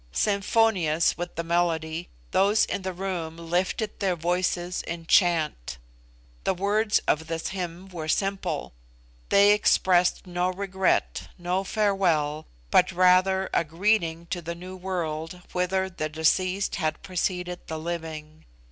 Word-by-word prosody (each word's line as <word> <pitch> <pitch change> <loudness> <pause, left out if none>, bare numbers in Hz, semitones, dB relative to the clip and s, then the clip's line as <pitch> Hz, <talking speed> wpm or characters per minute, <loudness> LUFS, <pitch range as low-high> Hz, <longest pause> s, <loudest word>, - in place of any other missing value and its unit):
Symphonious 200 - +2
with 175 +1 -6
the 170 - -2
melody, 165 -1 -1 0.2
those 200 +3 +4
in - - -3
the 190 0 -3
room 175 -3 -4
lifted 180 +6 -2
their 190 -3 +1
voices 175 +1 -1
in 165 0 -5
chant. 160 - +2 0.7
The 190 - +1
words 205 +3 +2
of 160 +1 +1
this 165 0 -3
hymn 180 -1 -5
were 165 -4 -6
simple. 195 - -1 0.6
They 200 +1 +6
expressed 185 -4 +3
no 180 0 -1
regret, 190 0 0
no 180 +2 -1
farewell, 180 -8 +1 0.2
but 185 - +5
rather 185 +1 +4
a - - +3
greeting 170 0 0
to 175 - -2
the 170 +1 -5
new 185 +2 -9
world 175 -2 -4
whither 190 +1 0
the 155 -4 -4
deceased 185 +5 +1
had 155 -4 -2
preceded 180 -1 -3
the 160 - -4
living. 160 -2 -6
180 Hz, 130 wpm, -26 LUFS, 165-190 Hz, 0.7 s, They